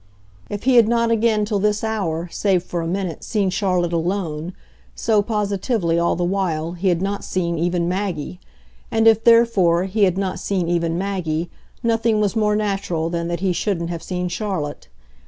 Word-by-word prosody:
If 205 Hz, -, -5 dB
he 255 Hz, 0 st, +4 dB
had 230 Hz, -2 st, +7 dB
not 235 Hz, 0 st, +2 dB
again, 220 Hz, -2 st, +2 dB
till 205 Hz, -1 st, -1 dB
this 210 Hz, +1 st, +1 dB
hour, 180 Hz, -7 st, -2 dB
save 190 Hz, -4 st, +1 dB
for 175 Hz, -, -3 dB
a 165 Hz, -, -3 dB
minute, 180 Hz, -2 st, -3 dB
seen 200 Hz, -4 st, 0 dB
Charlotte 180 Hz, -3 st, 0 dB
alone, 170 Hz, -1 st, -2 dB, 0.4 s
so, 215 Hz, -2 st, +2 dB
positively, 205 Hz, -4 st, 0 dB
all 170 Hz, -, +1 dB
the 180 Hz, -, -1 dB
while, 175 Hz, -3 st, -1 dB
he 180 Hz, +2 st, -3 dB
had 175 Hz, 0 st, +2 dB
not 200 Hz, +1 st, -2 dB
seen 170 Hz, -3 st, -2 dB
even 175 Hz, 0 st, 0 dB
Maggie; 180 Hz, -, -3 dB, 0.5 s
and 225 Hz, 0 st, +2 dB
if, 225 Hz, 0 st, +5 dB
therefore, 220 Hz, -8 st, +4 dB
he 200 Hz, +2 st, +2 dB
had 185 Hz, -1 st, 0 dB
not 195 Hz, -1 st, -2 dB
seen 185 Hz, -4 st, -1 dB
even 170 Hz, -1 st, 0 dB
Maggie, 175 Hz, -4 st, -2 dB, 0.3 s
nothing 225 Hz, -1 st, +2 dB
was 210 Hz, 0 st, 0 dB
more 210 Hz, -1 st, +2 dB
natural 195 Hz, -6 st, -1 dB
than 170 Hz, -1 st, -2 dB
that 170 Hz, +1 st, -3 dB
he 190 Hz, -2 st, +1 dB
shouldn't 170 Hz, -3 st, -2 dB
have 170 Hz, -1 st, -5 dB
seen 180 Hz, +1 st, -3 dB
Charlotte. 175 Hz, -, -4 dB
190 Hz, 180 wpm, -21 LUFS, 170-210 Hz, 0.5 s, had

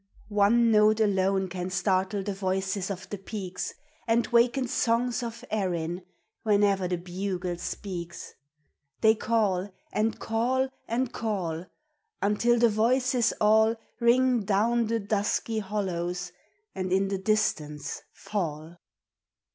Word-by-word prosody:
One 220 Hz, +3 st, +4 dB
note 215 Hz, 0 st, +5 dB
alone 195 Hz, -2 st, +2 dB
can 180 Hz, 0 st, -4 dB
startle 190 Hz, +2 st, 0 dB
the 205 Hz, 0 st, -3 dB
voices 190 Hz, 0 st, -1 dB
of 195 Hz, -1 st, -5 dB
the 205 Hz, -, -4 dB
peaks, 190 Hz, -2 st, -5 dB, 0.4 s
And 230 Hz, +1 st, +3 dB
waken 240 Hz, +2 st, +3 dB
songs 240 Hz, +1 st, +1 dB
of 235 Hz, +1 st, -6 dB
Erin, 175 Hz, -4 st, -1 dB, 0.4 s
whene'er 200 Hz, -3 st, +3 dB
the 180 Hz, 0 st, -1 dB
bugle 180 Hz, 0 st, -3 dB
speaks. 175 Hz, -2 st, -6 dB, 0.7 s
They 220 Hz, 0 st, +6 dB
call 205 Hz, -4 st, 0 dB, 0.2 s
and 220 Hz, +1 st, 0 dB
call 250 Hz, +4 st, 0 dB, 0.2 s
and 240 Hz, +2 st, -1 dB
call, 180 Hz, -6 st, -3 dB, 0.5 s
Until 220 Hz, +4 st, +2 dB
the 235 Hz, 0 st, +5 dB
voices 245 Hz, +3 st, +2 dB
all 220 Hz, +1 st, +4 dB, 0.2 s
Ring 245 Hz, 0 st, +3 dB
down 220 Hz, +4 st, +2 dB
the 230 Hz, +1 st, 0 dB
dusky 210 Hz, +2 st, -1 dB
hollows 180 Hz, -4 st, -3 dB, 0.4 s
and 185 Hz, -1 st, -3 dB
in 195 Hz, +1 st, +2 dB
the 195 Hz, -1 st, -2 dB
distance 155 Hz, -8 st, -1 dB
fall. 165 Hz, -4 st, -4 dB
205 Hz, 120 wpm, -27 LUFS, 185-225 Hz, 0.7 s, They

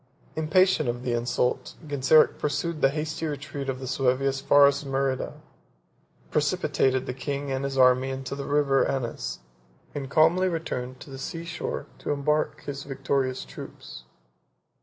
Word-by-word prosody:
Impatient 165 Hz, -1 st, +3 dB
of 120 Hz, +1 st, -3 dB
the 125 Hz, -2 st, -1 dB
insult, 120 Hz, +1 st, -1 dB
Genseric 145 Hz, +1 st, +4 dB
pursued 150 Hz, +2 st, -2 dB
the 135 Hz, -, +6 dB
hasty 155 Hz, +2 st, -3 dB
retreat 140 Hz, -1 st, -5 dB
of 130 Hz, -1 st, -2 dB
the 130 Hz, -, -6 dB
Suevi 130 Hz, +1 st, +1 dB
as 135 Hz, 0 st, 0 dB
far 140 Hz, +1 st, +6 dB
as 140 Hz, +1 st, +2 dB
Merida; 135 Hz, -1 st, -1 dB, 1.0 s
precipitated 130 Hz, -1 st, +1 dB
the 125 Hz, -, -3 dB
king 140 Hz, +1 st, -4 dB
and 135 Hz, +1 st, -1 dB
his 135 Hz, -1 st, -2 dB
army 130 Hz, 0 st, +5 dB
into 135 Hz, 0 st, -4 dB
the 140 Hz, 0 st, -4 dB
River 145 Hz, -2 st, +3 dB
Anas, 115 Hz, -, -3 dB, 0.5 s
and 135 Hz, -2 st, -5 dB
calmly 170 Hz, +5 st, +4 dB
returned 130 Hz, -7 st, -4 dB
to 140 Hz, -, -10 dB
the 135 Hz, -, -7 dB
sea 165 Hz, +5 st, -5 dB
shore 170 Hz, 0 st, -4 dB
to -, -, -6 dB
embark 150 Hz, +1 st, 0 dB
his 140 Hz, -1 st, -5 dB
victorious 135 Hz, -1 st, -1 dB
troops. -, -, -10 dB
140 Hz, 155 wpm, -26 LUFS, 130-150 Hz, 1.0 s, the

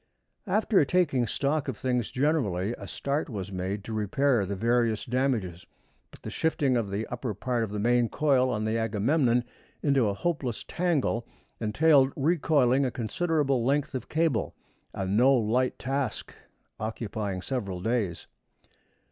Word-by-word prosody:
After 205 Hz, -1 st, +3 dB
taking 145 Hz, -6 st, +1 dB
stock 140 Hz, +6 st, -1 dB
of 130 Hz, -5 st, -3 dB
things 125 Hz, -4 st, -1 dB
generally, 120 Hz, -, 0 dB
a -, -, -8 dB
start 145 Hz, +3 st, -2 dB
was 100 Hz, -4 st, -5 dB
made 95 Hz, +2 st, -3 dB
to 110 Hz, -, -6 dB
repair 110 Hz, +1 st, +1 dB
the 100 Hz, -, -3 dB
various 115 Hz, +1 st, +1 dB
damages; 120 Hz, -9 st, -1 dB, 0.5 s
but -, -, -17 dB
the -, -, -6 dB
shifting 145 Hz, -5 st, +1 dB
of 115 Hz, -4 st, 0 dB
the 100 Hz, +3 st, -2 dB
upper 120 Hz, -2 st, -4 dB
part 125 Hz, -2 st, -1 dB
of 110 Hz, -, -3 dB
the 105 Hz, -, -4 dB
main 120 Hz, +2 st, +2 dB
coil 135 Hz, -4 st, +2 dB
on 110 Hz, -3 st, -1 dB
the 110 Hz, +1 st, 0 dB
Agamemnon 120 Hz, +3 st, +2 dB, 0.4 s
into 140 Hz, -6 st, +3 dB
a 100 Hz, -, -2 dB
hopeless 140 Hz, -6 st, -2 dB
tangle 150 Hz, -9 st, 0 dB, 0.3 s
entailed 135 Hz, +5 st, +4 dB
recoiling 140 Hz, -4 st, +2 dB
a 130 Hz, -, +1 dB
considerable 135 Hz, +2 st, 0 dB
length 140 Hz, +3 st, 0 dB
of 130 Hz, -, -5 dB
cable, 155 Hz, -9 st, 0 dB, 0.4 s
a 95 Hz, -, -4 dB
no 120 Hz, +8 st, +4 dB
light 125 Hz, +2 st, +1 dB
task, 135 Hz, -1 st, -3 dB, 0.5 s
occupying 105 Hz, -3 st, -4 dB
several 100 Hz, -9 st, -3 dB
days. 105 Hz, -4 st, -1 dB
125 Hz, 150 wpm, -27 LUFS, 110-140 Hz, 0.5 s, entailed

